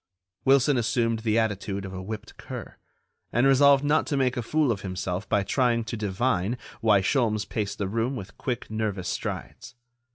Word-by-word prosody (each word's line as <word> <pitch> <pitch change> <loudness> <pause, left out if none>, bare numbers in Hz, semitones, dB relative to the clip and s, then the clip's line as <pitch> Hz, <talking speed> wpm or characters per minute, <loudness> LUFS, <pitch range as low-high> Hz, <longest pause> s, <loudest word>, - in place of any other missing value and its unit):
Wilson 135 +1 +4
assumed 115 -1 +1
the 110 0 +1
attitude 100 -3 -1
of 95 - -7
a 95 - -5
whipped 105 +3 -7
cur, - - -8 0.6
and 120 +3 +3
resolved 140 +1 +6
not 150 +2 +2
to 145 - 0
make 130 -2 +2
a 120 - -1
fool 145 +3 +1
of 100 -4 -2
himself 95 0 -4
by 100 - +2
trying 120 +2 +1
to 110 +1 -5
divine 105 +1 0 0.2
why 105 -3 +4
Sholmes 105 -1 +1
paced 105 -2 -3
the 100 - -2
room 115 +6 -1
with 100 -5 -8
quick, 120 -4 -4
nervous 105 -4 -2
strides. 125 +3 -5
110 Hz, 175 wpm, -26 LUFS, 100-125 Hz, 0.6 s, resolved